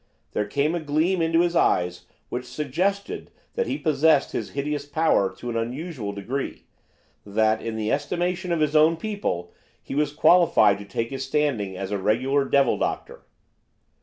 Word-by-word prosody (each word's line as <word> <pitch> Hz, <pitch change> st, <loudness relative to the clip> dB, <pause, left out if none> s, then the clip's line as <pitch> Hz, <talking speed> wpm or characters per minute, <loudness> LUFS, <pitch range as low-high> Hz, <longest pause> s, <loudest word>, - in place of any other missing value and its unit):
There 105 Hz, -, -1 dB
came 140 Hz, +8 st, 0 dB
a 175 Hz, -, -1 dB
gleam 160 Hz, +4 st, +1 dB
into 165 Hz, +1 st, +3 dB
his 175 Hz, 0 st, 0 dB
eyes 90 Hz, -, +1 dB, 0.2 s
which 125 Hz, 0 st, -4 dB
suggested 170 Hz, +10 st, -2 dB, 0.2 s
that 475 Hz, -1 st, -1 dB
he 275 Hz, -, -1 dB
possessed 155 Hz, -, +3 dB
his -, -, -3 dB
hideous 145 Hz, +1 st, -1 dB
power 145 Hz, -10 st, +2 dB
to 120 Hz, -, -6 dB
an -, -, -5 dB
unusual 125 Hz, -, -3 dB
degree, 115 Hz, +8 st, -4 dB, 0.6 s
that, 110 Hz, +2 st, +1 dB
in 115 Hz, -1 st, -4 dB
the 110 Hz, -1 st, -1 dB
estimation 175 Hz, +5 st, -1 dB
of 170 Hz, -2 st, +1 dB
his 150 Hz, 0 st, +1 dB
own 155 Hz, +2 st, +5 dB
people, 165 Hz, -, -3 dB, 0.3 s
he -, -, -8 dB
was 145 Hz, +1 st, +1 dB
qualified 170 Hz, -, +5 dB
to 100 Hz, -, -9 dB
take 115 Hz, +4 st, -3 dB
his 135 Hz, -1 st, -3 dB
standing 130 Hz, -9 st, -1 dB
as 95 Hz, +1 st, -5 dB
a 100 Hz, -, -1 dB
regular 130 Hz, +8 st, +1 dB
devil 135 Hz, -1 st, +2 dB
doctor. -, -, -3 dB
140 Hz, 165 wpm, -24 LUFS, 115-165 Hz, 0.6 s, own